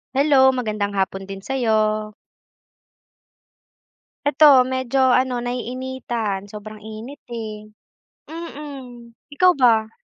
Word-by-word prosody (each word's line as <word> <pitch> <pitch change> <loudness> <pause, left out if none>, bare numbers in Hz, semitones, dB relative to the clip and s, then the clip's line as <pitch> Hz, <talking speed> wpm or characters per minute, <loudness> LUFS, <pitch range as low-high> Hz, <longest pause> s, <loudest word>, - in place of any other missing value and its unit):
Hello, 270 -1 +5
magandang 215 -5 -2
hapon 195 -1 -2
din 195 0 -8
sa 270 +7 -5
'yo. 215 -3 +1 2.1
Ito, 290 -2 +7
medyo, 260 0 0
ano, 255 -1 +2
naiinitan. 245 -4 -4
Sobrang 210 +1 -10
init, 220 +6 -10
eh. 215 -2 -6 0.6
Mm. 275 -7 -9 0.2
Ikaw 365 +5 +5
ba? 225 -4 +3
240 Hz, 95 wpm, -21 LUFS, 215-265 Hz, 2.1 s, Ito